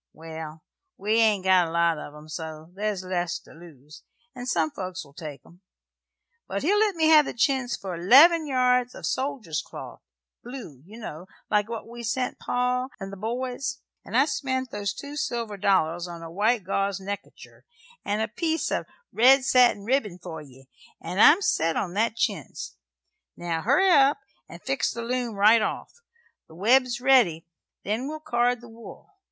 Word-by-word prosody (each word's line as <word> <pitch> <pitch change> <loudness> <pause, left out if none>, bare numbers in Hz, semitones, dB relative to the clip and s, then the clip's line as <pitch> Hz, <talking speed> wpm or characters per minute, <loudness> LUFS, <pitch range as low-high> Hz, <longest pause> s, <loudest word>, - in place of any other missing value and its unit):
Well, 160 0 -9 0.3
we 215 +3 +1
ain't 215 -4 +3
got 185 -2 +4
a - - -5
great 165 - -7
lot 170 -2 +2
of 145 - -9
'em, 150 +1 -13
so 155 +1 -7
there's 205 -1 -3
less 175 -1 -2
to - - -18
lose, 155 -3 -15 0.3
and 250 -1 -8
some 160 -7 +1
folks 185 -2 -6
will 140 - -19
take 145 -3 -8
'em; 175 +2 -20 0.9
but - - -3
he'll 405 +7 +3
let 425 -3 +2
me 320 -1 +3
have 305 -2 +7
the - - -6
chintz 250 0 +1
for 185 -3 -6
'leven 305 - +7
yards 250 -2 +2
o' - - -11
soldier's 240 - -2
cloth - - -10 0.4
blue, 240 - -9
ye 215 +3 -12
know, 180 -6 -8 0.2
like 210 0 +2
what 230 -1 -6
we 240 +1 -9
sent 245 +2 -2
pa 250 +1 -1
and 195 -1 -7
the - - -5
boys. 245 +6 -4 0.2
And - - -2
I 270 - +5
spent 260 -4 -2
them 205 0 -6
two 285 +9 -5
silver 235 -7 -3
dollars 180 -4 +1
on 170 -1 -8
a 165 - -8
white 215 +4 +1
gauze 195 +1 -1
neck 200 +1 -4
kercher - - -17 0.4
and 210 +2 -1
a - - -1
piece 320 +7 -2
of - - -2 0.3
red 260 +3 +5
satin 250 -6 +4
ribbin 225 -7 0
for 175 -3 -8
ye, 135 -2 -16 0.3
for 165 - -9
I'm 295 - +6
set 165 - +1
on 175 -3 -2
that 220 +3 0
chintz. 230 -4 -3 0.6
Now 170 -2 -3
hurry 290 - +3
up 280 -3 +5 0.3
'nd 170 +1 -11
fix 270 +1 0
the 235 - -5
loom 240 -2 -2
right 215 +3 +5
off. 215 - -3 0.5
The 160 - -16
web's 240 +5 +3
ready, 245 -11 +3 0.4
then 220 +6 -2
we'll 310 +1 -5
card 245 -4 0
the 240 - -12
wool. 225 - -13
215 Hz, 180 wpm, -25 LUFS, 175-250 Hz, 0.9 s, have